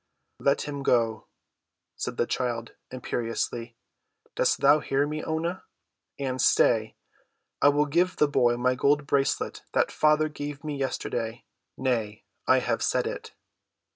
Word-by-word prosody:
"Let 140 Hz, +1 st, +2 dB
him 140 Hz, -1 st, -5 dB
go," 115 Hz, -4 st, +1 dB, 0.7 s
said -, -, -4 dB
the -, -, +2 dB
child 120 Hz, -2 st, -2 dB, 0.2 s
imperiously. 120 Hz, -1 st, -3 dB, 0.6 s
"Dost -, -, +1 dB
thou 145 Hz, +2 st, +6 dB
hear 140 Hz, 0 st, 0 dB
me, 155 Hz, +1 st, -4 dB
Oonah? 165 Hz, +3 st, -2 dB, 0.6 s
And, 130 Hz, -2 st, -2 dB
stay, 110 Hz, -2 st, +3 dB, 0.7 s
I 145 Hz, -, +7 dB
will 145 Hz, +1 st, +2 dB
give 175 Hz, +5 st, +1 dB
the 150 Hz, -, +3 dB
boy 120 Hz, -4 st, +2 dB
my 125 Hz, +1 st, +2 dB
gold 140 Hz, +3 st, +2 dB
bracelet 140 Hz, -1 st, 0 dB
that -, -, +2 dB
father 155 Hz, 0 st, +3 dB
gave 145 Hz, -1 st, -7 dB
me 150 Hz, -1 st, -3 dB
yesterday. 120 Hz, -4 st, -3 dB, 0.3 s
Nay, 115 Hz, -5 st, -1 dB, 0.2 s
I -, -, +5 dB
have -, -, -1 dB
said -, -, +1 dB
it!" -, -, -6 dB
135 Hz, 140 wpm, -27 LUFS, 120-145 Hz, 0.7 s, I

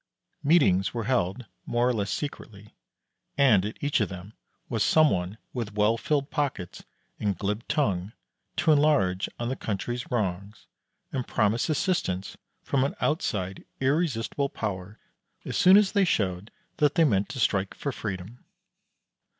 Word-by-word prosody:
Meetings 110 Hz, -, +3 dB
were 115 Hz, -, -1 dB
held 115 Hz, -1 st, 0 dB, 0.2 s
more 120 Hz, +1 st, +2 dB
or 125 Hz, -, +2 dB
less 100 Hz, -4 st, -2 dB
secretly, 105 Hz, -7 st, -6 dB, 0.6 s
and 125 Hz, -9 st, +5 dB
at 105 Hz, +2 st, -5 dB
each 145 Hz, -3 st, +1 dB
of 105 Hz, -, 0 dB
them 95 Hz, +2 st, -9 dB, 0.3 s
was 115 Hz, -4 st, 0 dB
some 155 Hz, -2 st, +5 dB
one 90 Hz, +3 st, -2 dB, 0.2 s
with 115 Hz, -5 st, -4 dB
well 105 Hz, +2 st, +3 dB
filled 140 Hz, +4 st, -1 dB
pockets 135 Hz, -, -3 dB, 0.4 s
and 100 Hz, -4 st, -1 dB
glib 105 Hz, +4 st, -2 dB
tongue, 105 Hz, -, 0 dB, 0.4 s
to 160 Hz, -, +3 dB
enlarge 110 Hz, -12 st, +3 dB
on 120 Hz, 0 st, -3 dB
the 130 Hz, -, -1 dB
country's 120 Hz, +2 st, -4 dB
wrongs, 100 Hz, -2 st, -3 dB, 0.5 s
and 130 Hz, -3 st, -3 dB
promise 110 Hz, +7 st, +1 dB
assistance 145 Hz, -, -1 dB, 0.3 s
from 135 Hz, -2 st, +1 dB
an 140 Hz, -, -1 dB
outside 95 Hz, -, -1 dB, 0.2 s
irresistible 140 Hz, -2 st, 0 dB
power 100 Hz, -3 st, -5 dB, 0.5 s
as -, -, -4 dB
soon 185 Hz, +2 st, +7 dB
as 205 Hz, -2 st, +4 dB
they 200 Hz, -2 st, +3 dB
showed 100 Hz, -, -1 dB, 0.3 s
that 150 Hz, -1 st, +2 dB
they 170 Hz, -, +5 dB
meant 105 Hz, -9 st, +2 dB
to 130 Hz, -, -6 dB
strike 100 Hz, -4 st, +1 dB
for 140 Hz, -, -3 dB
freedom. 105 Hz, 0 st, -6 dB
115 Hz, 150 wpm, -27 LUFS, 100-140 Hz, 0.6 s, soon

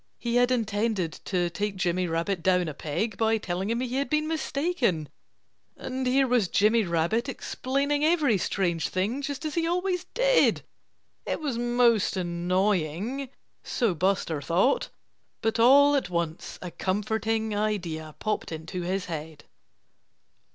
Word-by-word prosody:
He 235 Hz, 0 st, -1 dB
had 245 Hz, 0 st, +4 dB
intended 215 Hz, -6 st, 0 dB
to 175 Hz, -3 st, 0 dB
take 205 Hz, +2 st, -2 dB
Jimmy 180 Hz, 0 st, 0 dB
Rabbit 170 Hz, +3 st, -1 dB
down 180 Hz, 0 st, +2 dB
a 155 Hz, -, -4 dB
peg 185 Hz, +9 st, -3 dB
by 225 Hz, 0 st, +2 dB
telling 190 Hz, -1 st, -3 dB
him 235 Hz, +2 st, 0 dB
he 255 Hz, 0 st, -2 dB
had 280 Hz, -, -1 dB
been 305 Hz, 0 st, +1 dB
mistaken. 280 Hz, -, -1 dB, 0.7 s
And 260 Hz, 0 st, -3 dB
here 270 Hz, +2 st, +4 dB
was 240 Hz, -6 st, +2 dB
Jimmy 215 Hz, +5 st, +3 dB
Rabbit, 170 Hz, -, 0 dB
explaining 280 Hz, +3 st, -1 dB
every 305 Hz, -, +3 dB
strange 175 Hz, -4 st, 0 dB
thing, 210 Hz, +9 st, -1 dB
just 285 Hz, +2 st, -4 dB
as 305 Hz, -, -2 dB
he 330 Hz, -1 st, 0 dB
always 360 Hz, +1 st, -1 dB
did! -, -, +3 dB, 0.6 s
It -, -, -1 dB
was 280 Hz, -7 st, -2 dB
most 240 Hz, -4 st, +2 dB
annoying 185 Hz, -, -1 dB, 0.3 s
so 230 Hz, -6 st, 0 dB
Buster 170 Hz, -3 st, 0 dB
thought. 180 Hz, -, +2 dB, 0.5 s
But 225 Hz, 0 st, -1 dB
all 285 Hz, +5 st, +7 dB
at 275 Hz, -, 0 dB
once 170 Hz, -2 st, -3 dB
a 180 Hz, -, -6 dB
comforting 220 Hz, +3 st, -1 dB
idea 175 Hz, -8 st, -2 dB
popped 215 Hz, -5 st, -2 dB
into 160 Hz, +3 st, -5 dB
his 185 Hz, +2 st, -2 dB
head. 155 Hz, -2 st, -7 dB
215 Hz, 145 wpm, -27 LUFS, 175-255 Hz, 0.7 s, all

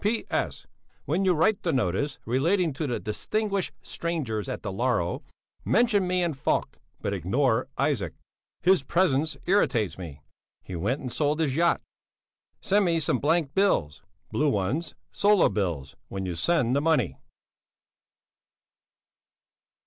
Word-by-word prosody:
B. 220 Hz, +3 st, +1 dB
P.S. -, -, -3 dB, 0.4 s
When 195 Hz, -, 0 dB
you 185 Hz, -2 st, +4 dB
write 195 Hz, +6 st, +2 dB
the 170 Hz, -, 0 dB
notice 130 Hz, -, 0 dB
relating 160 Hz, -, +1 dB
to 145 Hz, +2 st, -3 dB
the 120 Hz, -, -2 dB
distinguished 200 Hz, -, -2 dB
strangers 140 Hz, -11 st, -3 dB
at -, -, -5 dB
Dalarö, 100 Hz, -3 st, -1 dB, 0.4 s
mention 210 Hz, -5 st, +3 dB
me 180 Hz, 0 st, +1 dB
and 165 Hz, -4 st, -1 dB
Falk, 135 Hz, -, -1 dB, 0.2 s
but 100 Hz, -, -1 dB
ignore 115 Hz, -, +1 dB
Isaac; 140 Hz, -7 st, 0 dB, 0.5 s
his 185 Hz, -2 st, +5 dB
presence 155 Hz, -1 st, +1 dB
irritates 115 Hz, -, +1 dB
me 75 Hz, -6 st, -8 dB, 0.4 s
he 95 Hz, -, -7 dB
went 110 Hz, -, -1 dB
and 125 Hz, -3 st, -5 dB
sold 150 Hz, +4 st, +1 dB
his 145 Hz, -5 st, +1 dB
yacht. 170 Hz, +2 st, +3 dB, 0.8 s
Send 200 Hz, +1 st, +3 dB
me 165 Hz, -2 st, +2 dB
some 130 Hz, -5 st, 0 dB
blank 155 Hz, -1 st, +1 dB
bills 190 Hz, -, +1 dB, 0.3 s
(blue 150 Hz, 0 st, +2 dB
ones, 130 Hz, -, -1 dB, 0.2 s
sola 205 Hz, -2 st, +4 dB
bills) 80 Hz, -10 st, -2 dB
when 95 Hz, -1 st, -4 dB
you 90 Hz, -, -2 dB
send 125 Hz, -, +1 dB
the 140 Hz, -, +2 dB
money. 150 Hz, -, +1 dB
145 Hz, 135 wpm, -27 LUFS, 105-175 Hz, 0.8 s, his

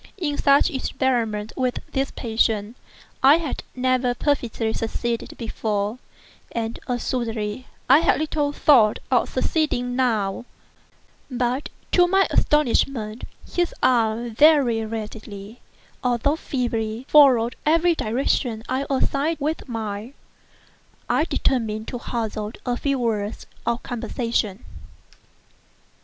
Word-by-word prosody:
In 305 Hz, -6 st, -2 dB
such 280 Hz, +4 st, +4 dB
experiments 235 Hz, -6 st, -1 dB
with 255 Hz, -1 st, -1 dB
this 270 Hz, 0 st, 0 dB
patient, 220 Hz, -1 st, 0 dB, 0.5 s
I 275 Hz, +3 st, +7 dB
had 330 Hz, -4 st, -4 dB
never 255 Hz, -1 st, +1 dB
perfectly 240 Hz, -6 st, -1 dB
succeeded 230 Hz, +1 st, -3 dB
before, 215 Hz, -1 st, -2 dB, 0.5 s
and 230 Hz, 0 st, -3 dB
assuredly 235 Hz, -2 st, -2 dB, 0.2 s
I 270 Hz, +4 st, +7 dB
had 335 Hz, -, +3 dB
little 300 Hz, -2 st, 0 dB
thought 245 Hz, -8 st, +4 dB
of 250 Hz, -, +3 dB
succeeding 255 Hz, -3 st, 0 dB
now; 225 Hz, -5 st, 0 dB, 0.8 s
but 250 Hz, +2 st, -1 dB, 0.2 s
to 355 Hz, -1 st, +5 dB
my 385 Hz, +2 st, +4 dB
astonishment, 250 Hz, -6 st, +1 dB, 0.3 s
his 350 Hz, -1 st, 0 dB
arm 230 Hz, -1 st, +2 dB
very 265 Hz, -4 st, +4 dB
readily, 215 Hz, -1 st, -7 dB, 0.4 s
although 250 Hz, +4 st, +1 dB
feebly, 235 Hz, -5 st, -3 dB
followed 255 Hz, -6 st, +5 dB
every 335 Hz, +3 st, +3 dB
direction 235 Hz, -3 st, -1 dB
I 260 Hz, +2 st, -1 dB
assigned 280 Hz, +3 st, +1 dB
it 320 Hz, -, -11 dB
with 300 Hz, -1 st, -2 dB
mine. 220 Hz, +2 st, -5 dB, 1.0 s
I -, -, +2 dB
determined 220 Hz, -4 st, -1 dB
to 245 Hz, -, -5 dB
hazard 220 Hz, -2 st, -4 dB
a 245 Hz, -, 0 dB
few 275 Hz, +2 st, -1 dB
words 220 Hz, -3 st, -2 dB, 0.2 s
of 235 Hz, +1 st, 0 dB
conversation. 230 Hz, -3 st, -2 dB
245 Hz, 110 wpm, -23 LUFS, 225-275 Hz, 1.0 s, I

